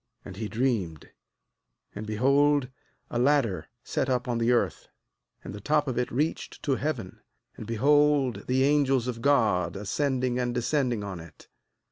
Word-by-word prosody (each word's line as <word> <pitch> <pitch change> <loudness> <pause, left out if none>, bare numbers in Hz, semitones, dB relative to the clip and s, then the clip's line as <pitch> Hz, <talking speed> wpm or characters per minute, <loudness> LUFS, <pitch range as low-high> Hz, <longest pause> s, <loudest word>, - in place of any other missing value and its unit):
12And 95 - -9
he 110 0 -3
dreamed, 110 - -2 0.8
and 105 - -7
be 110 - -3
hold 140 +2 +3 0.4
a 120 - -1
ladder 120 - +2 0.2
set 135 - -2
up 125 -1 0
on 120 -1 -1
the 115 +1 +2
earth, 100 -8 0 0.6
and - - -7
the 105 - -8
top 150 +5 +1
of 125 -2 -1
it 125 - -1
reached 150 +7 -3
to 140 - +1
heaven; 130 -10 -4 0.4
and 110 - -9
behold 140 +2 +2
the 130 +1 +2
angels 135 -3 +2
of 120 -2 -4
God 110 -11 +2
ascending 125 +4 -1
and 120 -1 -1
descending 125 -3 0
on 95 -3 -6
it. 80 -1 -14
125 Hz, 160 wpm, -27 LUFS, 110-140 Hz, 0.8 s, hold